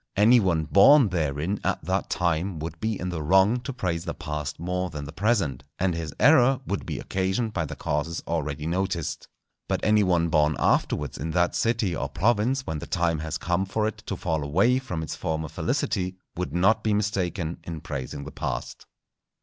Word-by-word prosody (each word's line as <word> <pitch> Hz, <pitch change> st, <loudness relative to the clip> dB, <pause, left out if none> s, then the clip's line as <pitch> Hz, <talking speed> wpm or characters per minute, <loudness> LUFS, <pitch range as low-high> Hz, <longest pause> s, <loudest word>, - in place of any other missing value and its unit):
Any 115 Hz, +5 st, +6 dB
one 85 Hz, -6 st, +1 dB
born 110 Hz, -, +6 dB
therein 80 Hz, +2 st, -1 dB
at -, -, -1 dB
that -, -, -1 dB
time 85 Hz, +1 st, 0 dB
would 80 Hz, +1 st, -6 dB
be 110 Hz, -2 st, -2 dB
in 90 Hz, -, -3 dB
the 85 Hz, -3 st, -3 dB
wrong 95 Hz, +9 st, +4 dB
to 135 Hz, -, -5 dB
praise 90 Hz, -9 st, -2 dB
the -, -, -4 dB
past 75 Hz, -1 st, -5 dB
more 90 Hz, +2 st, -2 dB
than 75 Hz, -3 st, -6 dB
the 70 Hz, -, -7 dB
present, 85 Hz, -, 0 dB
and 95 Hz, -1 st, +1 dB
his 80 Hz, -2 st, -4 dB
error 135 Hz, -3 st, +5 dB
would 100 Hz, -, -3 dB
be -, -, -3 dB
occasioned 95 Hz, +4 st, -1 dB
by 85 Hz, -5 st, -1 dB
the -, -, -6 dB
causes 75 Hz, +3 st, -2 dB
already 75 Hz, -2 st, -2 dB
noticed. 85 Hz, -2 st, -2 dB, 0.4 s
But -, -, -1 dB
any 105 Hz, 0 st, +4 dB
one 85 Hz, -3 st, +2 dB
born 75 Hz, -1 st, +3 dB
afterwards 75 Hz, -2 st, 0 dB
in 80 Hz, +4 st, -3 dB
that 90 Hz, 0 st, +2 dB
city 115 Hz, -6 st, 0 dB
or -, -, -3 dB
province 120 Hz, +7 st, +1 dB
when 80 Hz, -8 st, -3 dB
the -, -, -7 dB
time 85 Hz, -3 st, 0 dB
has 80 Hz, 0 st, -3 dB
come 90 Hz, +2 st, 0 dB
for 105 Hz, +3 st, -1 dB
it 110 Hz, -, -4 dB
to -, -, -2 dB
fall 80 Hz, -2 st, -1 dB
away 100 Hz, -, +3 dB
from 90 Hz, -12 st, -4 dB
its 80 Hz, -, -5 dB
former 80 Hz, -1 st, -2 dB
felicity, 90 Hz, +4 st, -1 dB, 0.2 s
would 85 Hz, -5 st, -3 dB
not 95 Hz, +7 st, +3 dB
be 110 Hz, -2 st, +2 dB
mistaken 95 Hz, -5 st, -1 dB
in 85 Hz, -2 st, -6 dB
praising 70 Hz, -3 st, -5 dB
the 75 Hz, -, -8 dB
past. -, -, -5 dB
90 Hz, 195 wpm, -26 LUFS, 80-105 Hz, 0.4 s, Any